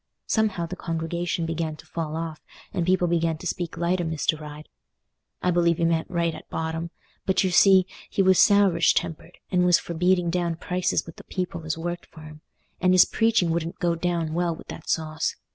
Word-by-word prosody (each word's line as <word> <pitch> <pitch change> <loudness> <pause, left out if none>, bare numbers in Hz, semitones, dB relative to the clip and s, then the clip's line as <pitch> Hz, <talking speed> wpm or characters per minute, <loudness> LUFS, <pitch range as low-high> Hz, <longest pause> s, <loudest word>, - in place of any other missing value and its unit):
Somehow, 210 -6 0
the 180 - -6
congregation 170 0 -2
began 165 -1 -2
to - - -15
fall 160 -2 -4
off, 160 -1 -5 0.3
and 170 -1 -1
people 180 -1 +3
began 165 -1 +1
to - - -11
speak 175 -2 -3
light 175 +1 +1
o' - - -1
Mr. 160 -1 -1
Ryde. 150 0 -9 0.8
I 180 - +3
believe 170 -1 +2
he 165 - +1
meant 165 -1 0
right 170 -2 0
at - - -11
bottom; 160 +1 -3 0.4
but, 190 0 +3
you 185 - +1
see, 190 0 +6 0.2
he 195 - +1
was 190 -1 +5
sourish 200 -5 +5
tempered, 170 0 -3
and 180 -1 +3
was 180 -1 +5
for 170 - -6
beating 180 0 +2
down 170 -1 0
prices 180 +2 -1
with 165 - -11
the - - -11
people 180 -3 -4
as 155 0 -2
worked 175 +1 -5
for 160 - -14
him; 155 0 -12 0.4
and 185 0 +4
his 185 - +8
preaching 225 -7 +2
wouldn't 165 0 -2
go 175 -1 +1
down 170 -2 -1
well 170 0 0
with - - -14
that - - -8
sauce. 155 -1 -1
170 Hz, 205 wpm, -25 LUFS, 165-180 Hz, 0.8 s, his